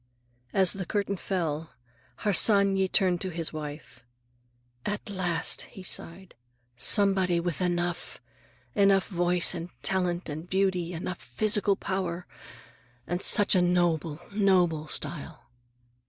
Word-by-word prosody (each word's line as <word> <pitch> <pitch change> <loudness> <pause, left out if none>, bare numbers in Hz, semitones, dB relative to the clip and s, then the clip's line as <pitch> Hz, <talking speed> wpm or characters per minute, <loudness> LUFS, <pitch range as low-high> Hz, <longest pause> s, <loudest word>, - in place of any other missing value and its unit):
As 190 -2 +4
the 195 -2 -5
curtain 200 -1 -1
fell, 165 -5 -3 0.5
Harsanyi 200 -1 +4
turned 185 -2 +1
to 190 - -3
his 165 -2 -3
wife. 150 -5 -8 0.8
"At 205 0 -4
last," 180 -4 +1 0.2
he 190 - -8
sighed, 185 +1 -3 0.4
"somebody 190 - +3
with 170 0 -3
Enough! 175 -1 -2 0.5
Enough 195 +1 +3
voice 175 -1 +2
and 170 0 -6
talent 180 -2 0
and 160 +3 -7
beauty, 185 -2 0
enough 175 +1 -5
physical 205 - +2
power. 185 -3 -3 0.8
And 175 +2 -3
such 205 - +5
a 185 - +4
noble, 170 -3 +1
noble 180 -6 +2
style!" 150 -5 -5
180 Hz, 115 wpm, -27 LUFS, 170-195 Hz, 0.8 s, such